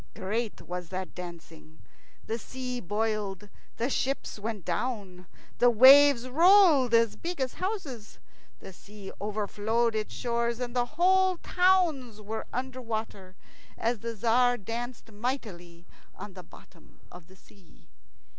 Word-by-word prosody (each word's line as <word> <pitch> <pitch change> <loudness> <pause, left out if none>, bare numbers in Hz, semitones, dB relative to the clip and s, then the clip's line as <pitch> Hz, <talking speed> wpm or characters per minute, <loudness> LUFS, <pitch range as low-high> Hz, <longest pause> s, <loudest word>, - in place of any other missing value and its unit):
Great 215 +4 -3
was 180 -1 -6
that 185 0 -5
dancing. 165 -3 -11 0.5
The 225 +1 -3
sea 250 +1 -6
boiled, 205 -1 -3 0.3
and 245 +4 -1
ships 270 -4 -2
went 210 -3 -5
down. 195 -8 -4 0.3
The 245 - +6
waves 260 +2 +7
rolled 320 - +5
as 230 -1 +3
big 345 -1 -6
as 260 -2 -1
houses. 310 - -5 0.4
The 190 - -11
sea 205 +1 -11
overflowed 215 +2 -1
its 215 -1 -3
shores, 235 -1 -1
and 245 -1 -5
whole 360 +9 +2
towns 335 - +1
were 215 +1 -6
under 260 +1 -4
water 215 -5 -6 0.4
as 230 0 -1
the 230 +1 -5
Tzar 245 +3 +2
danced 235 +2 -6
mightily 205 -7 -5 0.3
on 205 0 -9
the 185 - -10
bottom - - -19
of 175 -2 -13
the 190 - -18
sea. 190 -1 -23
230 Hz, 130 wpm, -28 LUFS, 205-255 Hz, 0.5 s, waves